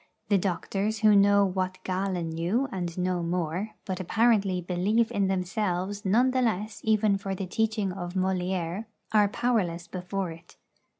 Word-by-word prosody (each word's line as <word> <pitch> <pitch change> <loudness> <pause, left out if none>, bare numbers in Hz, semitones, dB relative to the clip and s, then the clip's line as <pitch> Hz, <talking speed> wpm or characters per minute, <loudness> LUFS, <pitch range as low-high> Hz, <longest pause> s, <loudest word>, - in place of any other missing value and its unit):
The 200 - +5
doctors, 200 +4 -2
who 215 -1 +6
know 200 0 +5
what 185 0 -2
Galen 185 -2 -2
knew 180 +12 0
and 175 -4 -4
no 180 -1 0
more, 175 +4 -2
but 185 -1 -3
apparently 200 -1 +2
believe 190 +6 +1
in 200 -1 +1
themselves 190 +1 -2
none 240 +7 +4
the 255 0 +1
less 215 -2 -1
even 215 -2 +2
for 195 -1 -3
the 195 - -4
teaching 215 +1 0
of 175 -1 -6
Molière, 185 +1 -1 0.3
are 210 -2 +5
powerless 195 -7 0
before 185 0 -4
it. 165 +2 -14
190 Hz, 155 wpm, -27 LUFS, 180-210 Hz, 0.3 s, who